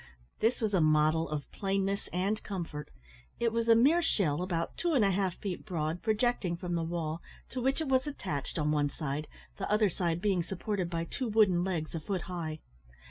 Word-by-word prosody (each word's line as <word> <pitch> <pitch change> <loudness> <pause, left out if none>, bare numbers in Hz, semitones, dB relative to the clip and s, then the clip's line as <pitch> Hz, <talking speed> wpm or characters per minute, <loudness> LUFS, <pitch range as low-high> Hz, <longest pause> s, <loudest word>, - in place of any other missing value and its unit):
This 230 +3 +2
was 215 -2 0
a 185 - +4
model 155 +1 +3
of 150 -2 -3
plainness 195 0 -1
and 195 +4 0
comfort. 165 -7 -5 0.5
It 230 -1 +1
was 230 0 0
a 230 - +8
mere 290 +9 +5
shell 180 - +1
about 170 -2 -2
two 345 -2 0
and 230 -6 +5
a 195 - +3
half 190 -1 0
feet 190 -4 -4
broad, 165 -3 -2
projecting 215 -5 +1
from 175 0 -4
the 170 - +1
wall, 165 -1 -2 0.3
to 255 - -4
which 270 +5 +1
it 315 - -1
was 260 +1 +2
attached 180 - -3
on 150 -1 +1
one 145 -1 +2
side, 150 0 -3 0.3
the 195 - -3
other 210 -1 +4
side 170 -1 -1
being 190 -2 +2
supported 190 +1 -2
by 165 -1 -1
two 255 +9 -3
wooden 205 -5 +4
legs 170 -5 -2
a 165 - -2
foot 185 +3 -2
high. 165 -4 -4
185 Hz, 200 wpm, -31 LUFS, 165-215 Hz, 0.5 s, a